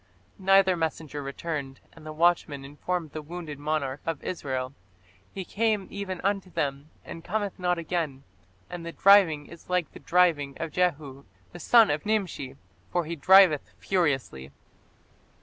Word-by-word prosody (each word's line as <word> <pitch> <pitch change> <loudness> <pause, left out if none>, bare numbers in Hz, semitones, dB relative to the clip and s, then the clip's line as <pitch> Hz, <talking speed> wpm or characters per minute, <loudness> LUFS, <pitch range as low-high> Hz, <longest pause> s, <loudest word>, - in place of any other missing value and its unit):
Neither 195 -1 +4
messenger 160 -3 -3
returned, 140 -1 -5
and 160 -1 -13
the - - -5
watchman 155 -3 +1
informed 155 +3 -4
the 155 - -6
wounded 155 -2 -8
monarch 145 -2 -2
of 165 -3 -4
Israel, 130 -6 -4 0.6
"He 190 -2 -6
came 215 0 0
even 190 -2 -5
unto 195 -1 -1
them, 140 -2 -3 0.2
and 165 - -9
cometh 205 +1 -3
not 180 -1 +1
again; 160 -5 -3 0.4
and 175 -1 -7
the 170 0 -6
driving 185 -7 +5
is 170 +3 -14
like 180 -2 0
the - - -12
driving 165 -6 +2
of 165 -1 -4
Jehu 145 -6 -1 0.3
the - - -10
son 230 -3 +5
of 145 0 -2
Nimshi; 195 -11 -2 0.3
for 175 -2 -1
he 170 +2 -4
driveth 180 -2 +5
furiously". 135 - -1
165 Hz, 150 wpm, -27 LUFS, 145-185 Hz, 0.6 s, driving